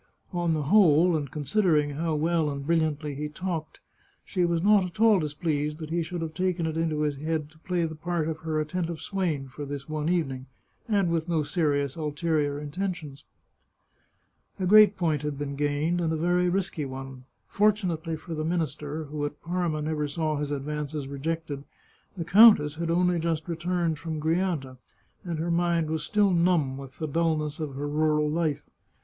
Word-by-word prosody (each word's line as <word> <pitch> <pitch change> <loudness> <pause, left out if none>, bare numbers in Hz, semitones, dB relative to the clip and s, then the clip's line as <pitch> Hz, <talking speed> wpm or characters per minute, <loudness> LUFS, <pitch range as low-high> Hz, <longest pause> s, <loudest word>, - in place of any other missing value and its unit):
On 175 -2 +1
the 150 - -1
whole, 175 -1 +5
and 145 -3 -2
considering 150 +1 +1
how 160 +2 -1
well 160 0 +1
and 140 -1 -5
brilliantly 155 -2 0
he 150 +2 -4
talked, 165 -1 -5 0.4
she 185 -3 0
was 170 -1 +1
not 205 -1 +5
at 180 +2 -7
all 220 -3 +6
displeased 150 -1 -2
that 160 -1 -7
he 170 +1 +1
should 165 +1 -4
have 160 -1 -5
taken 180 -1 0
it 160 -1 -2
into 160 -2 0
his 150 -2 0
head 155 0 -2
to 155 - -22
play 175 0 -1
the 160 - -4
part 165 0 -2
of 160 -1 -3
her 155 -1 -2
attentive 165 +1 -2
swain 170 -9 -2
for 145 +3 -8
this 140 -1 -6
one 155 0 -2
evening, 135 -7 -1 0.4
and 200 -5 +2
with 165 0 -1
no 160 -3 +1
serious 145 -4 0
ulterior 150 -1 -1
intentions. 150 -2 -5 1.3
A 185 - 0
great 210 +1 +7
point 160 -5 +1
had 150 -1 -3
been 140 -1 -4
gained, 145 +4 0
and 165 -2 0
a - - 0
very 175 +2 +2
risky 185 -4 -1
one. 135 -1 -7 0.2
Fortunately 185 -6 +1
for 160 +2 -8
the 155 -1 -2
minister, 155 -2 -2
who 150 0 -5
at 145 0 -4
Parma 170 -3 -1
never 150 -1 -1
saw 155 +1 -1
his 145 0 -2
advances 145 0 -3
rejected, 145 0 -4 0.5
the 165 - -3
countess 195 -7 +7
had 170 0 -2
only 175 0 +2
just 165 -1 -1
returned 170 -1 -1
from 160 -2 -4
Grianta, 160 -5 -1 0.5
and 170 -3 -3
her 165 +2 -1
mind 170 -2 +1
was 160 -1 -1
still 205 +4 +2
numb 170 -6 +2
with 135 -1 -10
the 155 - -3
dulness 155 0 0
of 150 -4 -4
her 145 +2 -3
rural 150 0 +2
life. 155 -1 -1
160 Hz, 180 wpm, -27 LUFS, 150-175 Hz, 1.3 s, great